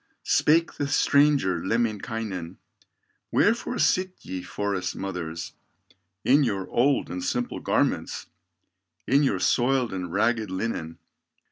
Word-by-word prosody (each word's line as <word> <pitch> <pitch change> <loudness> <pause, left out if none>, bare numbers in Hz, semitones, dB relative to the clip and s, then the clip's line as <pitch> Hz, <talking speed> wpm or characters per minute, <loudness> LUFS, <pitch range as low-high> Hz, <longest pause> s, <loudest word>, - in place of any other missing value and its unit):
Spake 165 +2 +3
the 145 - -1
stranger 140 - +3
Lemminkainen: 110 -5 -2 0.7
"Wherefore - - +2
sit 185 0 +1
ye, 95 0 -5
forest 95 0 -3
mothers, 85 -4 -5 0.7
In 140 +3 +5
your 100 -7 -1
old 135 +3 +2
and 90 0 -4
simple 120 +6 -2
garments, - - 0 0.8
In 140 +2 +3
your 140 - +2
soiled 125 -2 +1
and 90 -2 -4
ragged 110 +2 +1
linen? 95 -4 -3
110 Hz, 110 wpm, -26 LUFS, 95-135 Hz, 0.8 s, In